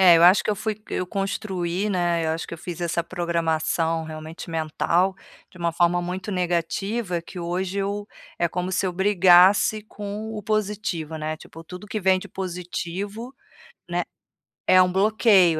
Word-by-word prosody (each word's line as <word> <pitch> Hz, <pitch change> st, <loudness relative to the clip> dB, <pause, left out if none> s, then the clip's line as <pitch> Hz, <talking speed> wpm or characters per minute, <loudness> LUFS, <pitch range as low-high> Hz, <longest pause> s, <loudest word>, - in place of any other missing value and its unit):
É, 175 Hz, -3 st, +8 dB
eu 165 Hz, -, +4 dB
acho 180 Hz, +3 st, +7 dB
que -, -, +1 dB
eu 210 Hz, -, +1 dB
fui 215 Hz, 0 st, -3 dB
eu 180 Hz, -, -1 dB
construí, 195 Hz, -1 st, -2 dB
né, 175 Hz, -3 st, +1 dB
eu 160 Hz, -, +1 dB
acho 160 Hz, 0 st, -3 dB
que -, -, -6 dB
eu -, -, -11 dB
fiz 175 Hz, 0 st, -7 dB
essa 170 Hz, 0 st, 0 dB
programação 165 Hz, -1 st, 0 dB
realmente 155 Hz, +2 st, -8 dB
mental, 165 Hz, +4 st, +1 dB, 0.4 s
de 185 Hz, -, -16 dB
uma 170 Hz, -1 st, 0 dB
forma 175 Hz, +1 st, +3 dB
muito 185 Hz, +3 st, -4 dB
negativa, 180 Hz, +2 st, -1 dB
que 180 Hz, -, -10 dB
hoje 185 Hz, +3 st, -2 dB
eu, 205 Hz, +1 st, -2 dB, 0.3 s
é 170 Hz, -, +2 dB
como 180 Hz, +2 st, -3 dB
se 190 Hz, -, +1 dB
eu 180 Hz, -, -1 dB
brigasse 190 Hz, +2 st, +5 dB
com 210 Hz, +1 st, -6 dB
o 210 Hz, -, -5 dB
positivo, 205 Hz, -7 st, -2 dB
né, 155 Hz, 0 st, -3 dB
tipo 165 Hz, +1 st, -13 dB
tudo 180 Hz, +5 st, -9 dB
que 215 Hz, -, -3 dB
vem 190 Hz, 0 st, +4 dB
de -, -, -9 dB
positivo, 190 Hz, +6 st, -5 dB, 0.5 s
né, -, -, 0 dB, 0.7 s
é 185 Hz, 0 st, +7 dB
um 180 Hz, 0 st, +3 dB
bloqueio, 195 Hz, -4 st, +4 dB
180 Hz, 175 wpm, -24 LUFS, 170-200 Hz, 0.7 s, É